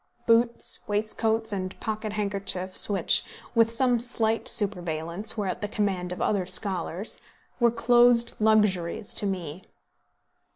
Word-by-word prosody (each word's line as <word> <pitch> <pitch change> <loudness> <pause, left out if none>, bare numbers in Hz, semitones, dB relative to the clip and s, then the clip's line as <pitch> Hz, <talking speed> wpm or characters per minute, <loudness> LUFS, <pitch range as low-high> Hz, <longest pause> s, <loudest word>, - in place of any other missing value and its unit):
Boots, 235 +1 +2
waistcoats, 220 +1 -1
and 185 -1 -5
pocket 215 -1 -4
handkerchiefs, 200 -3 0
which, 195 -4 +2 0.3
with 230 -1 +3
some 245 0 +2
slight 225 -2 -1
superveillance, 175 0 0
were 205 - -1
at 185 - -3
the 205 - -2
command 195 -4 -2
of 180 - -5
other 190 -4 0
scholars, 185 0 -2 0.4
were 240 -1 +5
closed 240 0 +4
luxuries 210 -4 +1
to 205 - -2
me. 180 -3 -5
210 Hz, 125 wpm, -26 LUFS, 185-225 Hz, 0.4 s, were